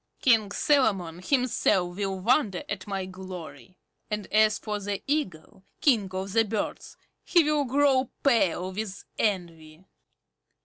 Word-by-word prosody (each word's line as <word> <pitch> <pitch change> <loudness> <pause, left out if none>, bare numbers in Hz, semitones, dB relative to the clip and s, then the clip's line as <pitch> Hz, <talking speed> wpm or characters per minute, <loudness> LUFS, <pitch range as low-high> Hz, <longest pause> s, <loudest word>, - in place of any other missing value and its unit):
King 220 -5 +3
Solomon 195 - +1
himself 195 -7 +1
will 195 -1 -2
wonder 220 -4 +2
at 200 -1 -5
my 195 -2 -3
glory. 185 -1 -10 0.3
And 210 -2 -3
as 215 0 +4
for 210 -1 -4
the 200 -1 -4
Eagle, 190 - -3 0.2
King 225 -9 +3
of 190 +1 -4
the 225 0 +4
Birds, 215 -1 -4 0.3
he 345 -2 +4
will 300 -1 +1
grow 265 -1 +2
pale 190 - +2
with 200 0 -5 0.2
envy. 170 -4 -3
205 Hz, 130 wpm, -27 LUFS, 185-240 Hz, 0.3 s, as